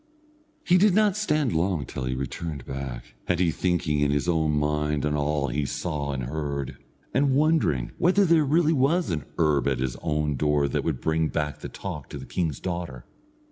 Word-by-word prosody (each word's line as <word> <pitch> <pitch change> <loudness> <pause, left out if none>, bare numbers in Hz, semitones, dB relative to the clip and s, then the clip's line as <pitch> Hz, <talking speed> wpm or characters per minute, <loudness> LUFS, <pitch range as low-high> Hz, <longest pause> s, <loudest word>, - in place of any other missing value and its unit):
He 180 +1 +4
did 200 -1 +4
not 210 -3 +4
stand 150 - +1
long 85 -2 0
till 65 - -5
he 65 0 -1
returned 70 +2 -5
back, 65 -3 -6
and 90 -1 +1
he 90 -3 +3
thinking 85 -4 0
in 70 -1 +2
his 70 +3 0
own 80 -3 +2
mind 75 0 0
on 75 0 0
all 75 -1 0
he 70 +4 -1
saw 75 0 -3
and 65 -2 -3
heard, 70 0 -4 0.3
and 135 -1 +3
wondering 145 - +2
whether 190 +3 +4
there 165 -3 +4
was 155 +5 +3 0.4
really - - -2
an 75 - -3
herb 75 -4 +2
at 65 -2 +1
his 65 0 -2
own 75 -2 -1
door 75 +1 +2
that 70 - -1
would - - -2
bring 80 0 +1
back 75 -1 -2
the - - -7
talk - - -7
to - - -6
the - - -8
king's 80 -7 -2
daughter. 85 -9 -5
75 Hz, 195 wpm, -26 LUFS, 70-90 Hz, 0.4 s, He